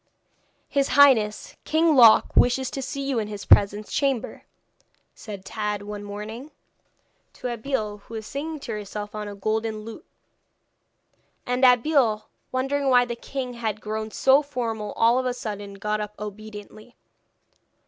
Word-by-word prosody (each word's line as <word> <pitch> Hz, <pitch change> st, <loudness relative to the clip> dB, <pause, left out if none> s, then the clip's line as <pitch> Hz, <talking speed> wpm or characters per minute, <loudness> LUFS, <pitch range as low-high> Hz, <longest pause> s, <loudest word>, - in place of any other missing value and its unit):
'His 280 Hz, -1 st, +1 dB
Highness 235 Hz, -7 st, +4 dB
King 320 Hz, 0 st, +3 dB
Loc 230 Hz, -4 st, +6 dB
wishes 255 Hz, +1 st, +3 dB
to 270 Hz, -, -4 dB
see 275 Hz, +1 st, -4 dB
you 275 Hz, -3 st, 0 dB
in 215 Hz, -, -3 dB
his 205 Hz, -1 st, -7 dB
presence 205 Hz, +1 st, +4 dB
chamber,' 275 Hz, -5 st, -1 dB, 0.7 s
said 200 Hz, -3 st, -9 dB
Tad, 210 Hz, 0 st, -3 dB
one 205 Hz, 0 st, -7 dB
morning, 215 Hz, +7 st, -7 dB, 0.8 s
to 250 Hz, -1 st, -4 dB
Abeille, 220 Hz, -4 st, -3 dB
who 225 Hz, +3 st, -11 dB
was 220 Hz, -1 st, -6 dB
singing 305 Hz, +5 st, -5 dB
to 235 Hz, -, -6 dB
herself 210 Hz, 0 st, -6 dB
on 210 Hz, -1 st, -5 dB
a 205 Hz, -, -7 dB
golden 215 Hz, +2 st, -2 dB
lute; 225 Hz, +1 st, -10 dB, 1.4 s
and 250 Hz, +1 st, -1 dB
Abeille, 245 Hz, -3 st, +4 dB, 0.3 s
wondering 270 Hz, +2 st, 0 dB
why 245 Hz, -1 st, +5 dB
the 240 Hz, -1 st, -4 dB
king 255 Hz, +1 st, -5 dB
had 220 Hz, -3 st, -3 dB
grown 215 Hz, +1 st, -4 dB
so 270 Hz, +5 st, +4 dB
formal 230 Hz, -7 st, -4 dB
all 235 Hz, +2 st, +3 dB
of 255 Hz, -, -1 dB
a 250 Hz, -, -2 dB
sudden, 205 Hz, -4 st, -6 dB
got 210 Hz, +2 st, -2 dB
up 210 Hz, 0 st, -6 dB
obediently. 210 Hz, +2 st, -9 dB
220 Hz, 150 wpm, -24 LUFS, 210-260 Hz, 1.4 s, Loc